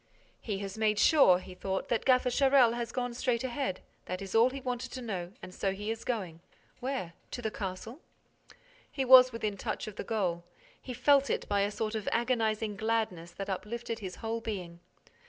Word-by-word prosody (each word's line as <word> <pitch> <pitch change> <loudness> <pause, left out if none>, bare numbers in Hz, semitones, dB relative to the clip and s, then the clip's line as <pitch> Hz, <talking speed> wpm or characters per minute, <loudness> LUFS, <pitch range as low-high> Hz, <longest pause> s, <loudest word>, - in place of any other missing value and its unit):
"He 210 -4 -3
has 195 +2 -6
made 215 -1 +2
sure," 240 - +6
he 185 0 -10
thought, 190 +1 -3
"that 235 -2 0
Gaffer 255 -1 +4
Charel 265 -3 +5
has 235 0 -3
gone 245 -1 -2
straight 240 0 0
ahead. 260 -6 -2 0.2
That 185 0 -4
is 195 -1 -7
all 230 +3 +6
he 275 +1 -6
wanted 250 -2 -4
to 255 - -5
know 185 -6 -4
and 185 0 -9
so 195 0 -1
he 205 +3 -4
is 225 0 -5
going—where? 200 +2 -5 0.2
To 245 - -6
the 220 - -1
castle?" 210 - -6 0.9
He 270 - -2
was 255 0 +9
within 215 -3 -3
touch 215 +2 -3
of 215 -1 -9
the - - -3
goal. 185 -7 -1 0.4
He 250 - -7
felt 275 +3 +4
it - - -1
by 200 -1 +1
a 200 - +1
sort 215 +1 -3
of 215 -2 -2
agonizing 225 -3 0
gladness 215 -6 -1
that 195 - -6
uplifted 225 +4 -4
his 190 -4 -6
whole 230 +1 -3
being. 180 -6 -5
220 Hz, 190 wpm, -30 LUFS, 195-245 Hz, 0.9 s, was